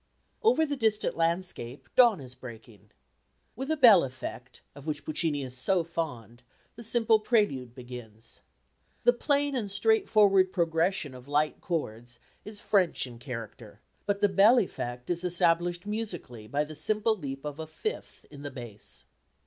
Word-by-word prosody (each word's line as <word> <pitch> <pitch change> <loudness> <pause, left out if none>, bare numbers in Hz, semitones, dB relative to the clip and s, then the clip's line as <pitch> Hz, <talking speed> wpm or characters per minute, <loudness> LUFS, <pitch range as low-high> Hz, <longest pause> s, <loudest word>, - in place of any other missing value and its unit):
Over 440 -8 +4
the 290 -1 -2
distant 220 -4 +1
landscape 165 -7 -2
dawn 240 -7 +6
is 125 -2 -11
breaking. 115 -5 -12 0.7
With 265 +4 -5
a 315 - +1
bell 225 - +8
effect, 130 -1 -7
of 145 +2 -12
which 150 -1 -3
Puccini 155 -2 -1
is 130 -1 -7
so 175 +7 +1
fond, 125 -8 -5 0.3
the 235 - -10
simple 225 -1 +3
prelude 205 - 0
begins. 120 -3 -10 0.6
The 245 - +6
plain 285 +2 0
and 220 -5 -2
straightforward 200 - +4
progression 165 -3 0
of 125 +1 -12
light 150 +1 0
chords 120 -8 -4 0.2
is 210 -1 -7
French 190 -9 +1
in 120 -2 -11
character, 115 -4 -8 0.3
but 200 0 0
the 205 - +6
bell 200 +6 +6
effect 125 - -2
is 175 0 -1
established 175 0 +1
musically 180 - -5
by 145 +5 0
the 155 +1 -8
simple 215 +8 +1
leap 135 -6 -7
of 150 +1 -5
a 160 - -5
fifth 435 - -6
in 145 -1 -11
the 145 - -5
bass. 120 -6 -7
165 Hz, 155 wpm, -29 LUFS, 125-210 Hz, 0.7 s, bell